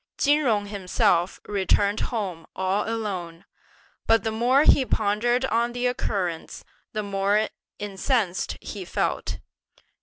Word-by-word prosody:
Chin 290 +1 +4
Jung 220 -8 +1
himself 185 -3 +1
returned 200 +1 +1
home 190 -9 -4
all 190 +3 0
alone, 185 -7 -4 0.6
but 225 0 +4
the 220 - -1
more 245 +6 +3
he 275 - +6
pondered 240 +3 +1
on 235 0 +1
the 245 +1 -2
occurrence, 190 -9 -2 0.3
the 215 - -2
more 200 +2 +1 0.3
incensed 205 -1 -1
he - - -6
felt. - - -2
210 Hz, 120 wpm, -25 LUFS, 190-235 Hz, 0.6 s, he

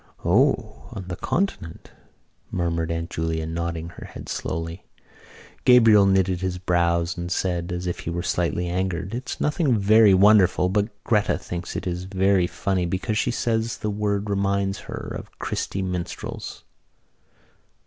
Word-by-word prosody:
"O, 110 - +2
on 95 -5 -7
the 90 - -3
continent," 125 - -3 0.6
murmured 85 -2 -1
Aunt 85 +1 -3
Julia, 80 0 -2
nodding 85 0 -3
her 85 - -11
head - - -10
slowly. 80 +2 -4 0.8
Gabriel 115 -5 +7
knitted 95 -2 +2
his 95 -1 -2
brows 85 0 +1
and 85 0 -5
said, 90 -1 -1
as 90 0 -3
if 90 - -3
he - - -5
were 85 +1 -3
slightly 85 0 0
angered: 95 +2 -2
"It's 125 +2 -5
nothing 150 - +1
very 105 0 +6
wonderful 95 -2 +5
but 105 +3 +1
Gretta 105 -3 +2
thinks 85 -1 -6
it - - -4
very 95 +1 +1
funny 90 +1 -1
because 105 +5 -1
she - - +1
says 115 -1 -1
the 105 - -2
word 100 0 -1
reminds 100 -1 0
her - - -5
of - - -9
Christy 95 - -3
Minstrels." 90 -2 -5
95 Hz, 145 wpm, -24 LUFS, 85-105 Hz, 0.8 s, Gabriel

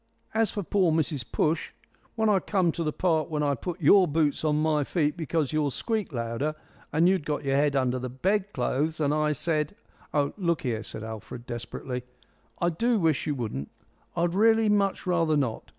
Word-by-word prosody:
As 225 -1 +2
for 205 - -3
pore 185 -1 +2
Mrs 155 -4 0
Push, 160 +2 0 0.4
when 220 -1 +1
I 205 -2 +4
come 185 -3 +1
to 170 - -3
the 155 - 0
part 160 -2 +1
when 150 -2 -1
I 145 -1 +2
put 175 +7 -5
your 185 +4 +6
boots 150 -1 +1
on 150 -1 +2
my 155 -1 +2
feet 150 0 0
because 160 -3 -1
yours 150 -3 0
squeaked 220 -6 -2
louder, 120 +5 -2 0.4
and 160 +3 +4
you'd 185 -3 +2
got 150 0 -2
your 135 -1 +1
head 145 0 +2
under 130 -1 +1
the 125 0 -4
bed 190 - 0
clothes, 145 +4 -1
and 145 -1 +2
I 155 0 +2
said 150 0 -1 0.2
" - - -28
"Oh, 145 -1 +1
look 170 -5 0
here," 115 -4 -1
said 110 - -7
Alfred, 110 +2 -7
desperately, 125 +1 -5 0.6
"I 175 - +2
do 230 +8 +1
wish 160 -5 +1
you 150 - 0
wouldn't. 105 - -4 0.5
I'd 170 0 +1
really 220 +2 +4
much 200 -2 +1
rather 165 -4 +2
not. 130 -6 -2
155 Hz, 200 wpm, -27 LUFS, 140-180 Hz, 0.6 s, your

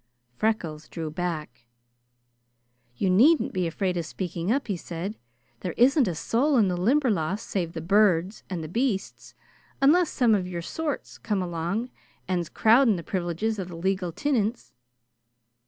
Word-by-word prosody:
Freckles 165 - -2
drew 160 -2 -5
back. 155 -8 -4 1.3
"You 190 - 0
needn't 250 - +4
be 185 -2 0
afraid 180 +2 -1
of 170 - -2
speaking 175 +2 -3
up," 275 +3 +1
he 200 - -1
said. 175 +3 -5 0.5
"There 180 - -4
isn't 260 +1 +5
a 175 - -2
soul 265 - +1
in 210 -5 +4
the 180 - 0
Limberlost 210 - +1
save 175 -6 -2
the 160 - -5
birds 190 +1 +2
and 175 -4 -4
the - - -5
beasts, 220 - -2 0.4
unless 320 +5 +4
some 240 -4 +3
of 190 -3 +1
your 175 -2 -5
sort's 310 - -4
come 205 -4 -1
along 175 +8 -3 0.4
and's 175 -3 -1
crowding 230 0 +4
the 170 - -5
privileges 185 +5 -2
of 185 - -4
the 175 - -8
legal 185 +1 -1
tinints." 235 - -1
190 Hz, 155 wpm, -26 LUFS, 170-230 Hz, 1.3 s, isn't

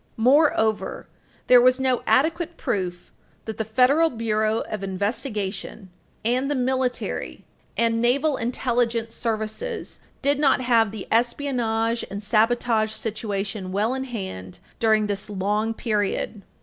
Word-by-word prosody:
Moreover, 240 -3 +2 0.4
there 250 -1 +7
was 255 +1 +4
no 260 -2 +1
adequate 335 +4 +2
proof 180 -3 -3 0.3
that 220 -1 -6
the - - +1
Federal 260 +9 +3
Bureau 220 -3 0
of 215 - -5
Investigation 200 -1 -4 0.3
and 255 +4 +1
the 290 - 0
military 255 0 -2 0.3
and 230 0 +2
naval 275 +5 +2
intelligence 235 -1 -1
services 230 - -3 0.2
did 285 +1 +3
not 275 -4 +4
have 230 -3 +3
the 210 -2 -7
espionage 235 -2 0
and 200 +2 -6
sabotage 220 0 +2
situation 210 -3 -4
well 210 +5 +1
in 265 0 -3
hand 190 - -6 0.2
during 220 -2 +3
this 205 0 -3
long 210 +3 0
period. 210 -1 -2
225 Hz, 125 wpm, -24 LUFS, 210-255 Hz, 0.4 s, there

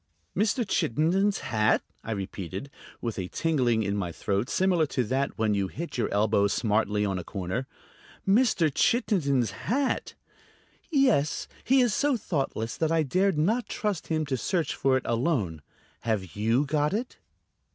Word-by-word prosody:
"Mr. 215 +4 +1
Chittenden's 185 - +1
hat?" 110 -1 +3 0.2
I - - -8
repeated, 95 - -5 0.3
with 115 -4 -3
a 90 - -3
tingling 125 - +1
in 100 0 -1
my 95 -4 -2
throat 100 +7 -1
similar 180 -4 +2
to 130 -2 0
that 130 +5 -1
when 110 -2 +1
you 100 -1 0
hit 165 - -6
your 120 - -1
elbow 100 0 +3
smartly 105 -1 +1
on 95 -2 -1
a - - -6
corner. 100 +8 -4 0.6
"Mr. 195 - +3
Chittenden's 140 - +2
hat?" 255 - -1 0.7
"Yes; 260 - +2 0.2
he 265 0 +4
is 240 -4 +2
so 280 +2 +2
thoughtless 135 - -2
that 160 -1 0
I 165 -1 +3
dared 185 +5 +1
not 215 +9 +1
trust 205 -6 -2
him 155 -1 0
to 135 -2 -1
search 170 - -1
for 135 -1 +2
it 130 - -4
alone. 115 - 0 0.4
Have 105 -6 -2
you 115 +7 +2
got 150 +2 +1
it?" 245 +3 -4
140 Hz, 155 wpm, -27 LUFS, -, 0.7 s, he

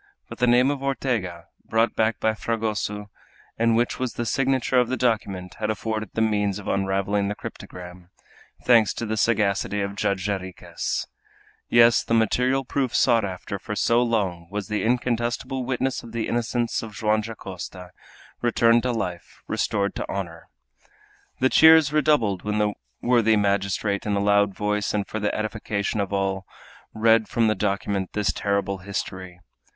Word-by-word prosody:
But - - -9
the 125 - +3
name 125 +3 +4
of 140 -2 -4
Ortega, 115 -11 -2 0.2
brought 115 +1 +1
back 110 0 +1
by 110 - +1
Fragoso, 105 -2 -3 0.5
and 115 0 +3
which 120 +1 0
was 130 -2 -2
the 120 - -2
signature 130 0 +1
of 125 -1 +1
the 130 - -1
document, 100 -7 -1
had 110 -1 -1
afforded 110 0 -3
the 110 - +1
means 105 -2 +1
of 105 - -9
unraveling 100 +1 0
the 105 - -2
cryptogram, 90 -2 -10 0.5
thanks 115 -4 +4
to 115 - -3
the 110 0 -2
sagacity 105 -2 +1
of 100 0 -3
Judge 100 -2 -1
Jarriquez. 95 -3 -3 0.6
Yes, 120 0 +5
the 115 - 0
material 125 +4 +2
proof 130 -2 -1
sought 120 -3 +4
after 95 +1 -5
for 105 - -5
so 115 +4 +3
long 100 -8 -1
was 105 +1 -5
the 105 0 -1
incontestable 120 +2 -1
witness 130 +1 -1
of 115 - -12
the 115 -1 -2
innocence 120 0 -1
of 110 -2 -9
Joam 110 0 +1
Dacosta, 95 -4 -8 0.5
returned 115 0 +4
to 125 - -1
life, 90 -7 -5
restored 100 -2 0
to - - -4
honor. 85 -4 -6 0.9
The 130 - +3
cheers 160 -1 +7
redoubled 145 -11 +2
when 105 0 -1
the 105 -1 +1 0.3
worthy 115 -3 +4
magistrate, 100 0 0
in 105 - +1
a - - +1
loud 100 -1 +3
voice, 105 0 -1
and 100 -1 0
for 110 - -5
the 105 - -1
edification 110 -1 -2
of 100 -1 -2
all, 95 -1 -1 0.4
read 110 0 +3
from 115 - +2
the 110 - +3
document 100 -1 -2
this 105 -1 0
terrible 100 -1 -1
history. 95 -1 -6
105 Hz, 165 wpm, -24 LUFS, 100-115 Hz, 0.9 s, cheers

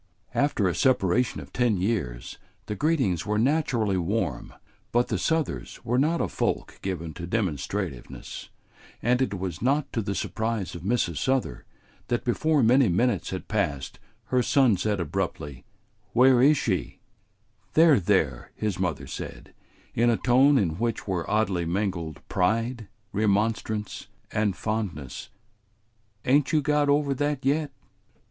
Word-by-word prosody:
After 140 -8 +1
a 90 - +1
separation 125 -1 +2
of - - -13
ten 120 -5 +2
years 90 - -2 0.3
the - - -3
greetings 130 - +1
were 105 +1 -1
naturally 120 -6 +1
warm, 90 - -2 0.4
but 120 +1 +2
the - - 0
Southers 160 -2 -1
were 120 +2 +1
not 160 +4 +2
a - - +1
folk - - -2
given 85 -4 -4
to 85 +2 -7
demonstrativeness, 90 - -3 0.5
and 125 +2 +2
it 105 -6 0
was 90 -1 -5
not 140 +4 +1
to 115 - 0
the 100 -1 -3
surprise 110 -3 -2
of 85 - -7
Mrs. 95 -5 0
Souther 130 - -1 0.4
that 120 - -1
before 150 +3 +2
many 125 0 +5
minutes 120 +8 +1
had - - -5
passed 70 -3 -2 0.3
her 125 - +4
son 130 -4 +4
said 100 +2 -1
abruptly: 80 -5 -3 0.5
"Where 125 0 +6
is 145 +3 +6
she?" 95 -8 -2 0.8
"There, 160 -5 +6
there," 85 -10 0
his 105 -4 -2
mother 80 -7 -1
said, - - -8 0.4
in 120 +1 +3
a 115 - +3
tone 135 +3 +4
in 85 -7 0
which 115 -2 -2
were 90 -4 -2
oddly 100 -5 +1
mingled 85 -3 -3
pride, 115 +4 0 0.3
remonstrance, 105 +1 0 0.2
and 105 -2 0
fondness, 100 - -4 1.0
"ain't 140 +2 +3
you 155 -3 +2
got 150 0 +2
over 140 -1 +2
that 145 0 -2
yet?" 145 +2 +1
110 Hz, 140 wpm, -26 LUFS, 90-130 Hz, 1.0 s, Where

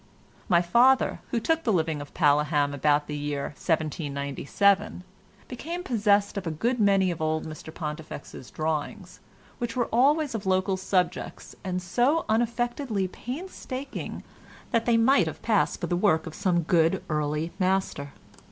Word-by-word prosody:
My 175 -2 +4
father, 245 +9 +4
who 235 - 0
took 325 +7 +1
the 225 - +1
living 160 -5 0
of 145 - -11
Paleham 145 -2 +2
about 145 +1 +2
the 150 - -5
year 145 -1 -3
1797, 155 +5 0 0.4
became 335 +8 -5
possessed 205 - +2
of 190 -3 -3
a - - +1
good 230 +11 -1
many 195 -3 +3
of 165 - -6
old 155 0 0
Mr 155 0 -8
Pontifex's 150 -5 -7
drawings, 160 +5 -4 0.4
which 235 -1 -3
were 245 -2 +1
always 285 +4 +3
of 210 -3 -4
local 185 +1 +2
subjects, 180 -2 -2
and 180 -1 -3
so 250 - +1
unaffectedly 235 -1 0
painstaking 270 - -6 0.5
that 230 -1 +1
they 235 -1 +4
might 260 +5 +4
have - - -7
passed - - +1
for - - -2
the 175 - -1
work 175 -4 +2
of 160 - -7
some 180 -3 +1
good 165 0 +2
early 150 +1 -1
master. 185 -7 0
185 Hz, 150 wpm, -26 LUFS, 155-230 Hz, 0.5 s, My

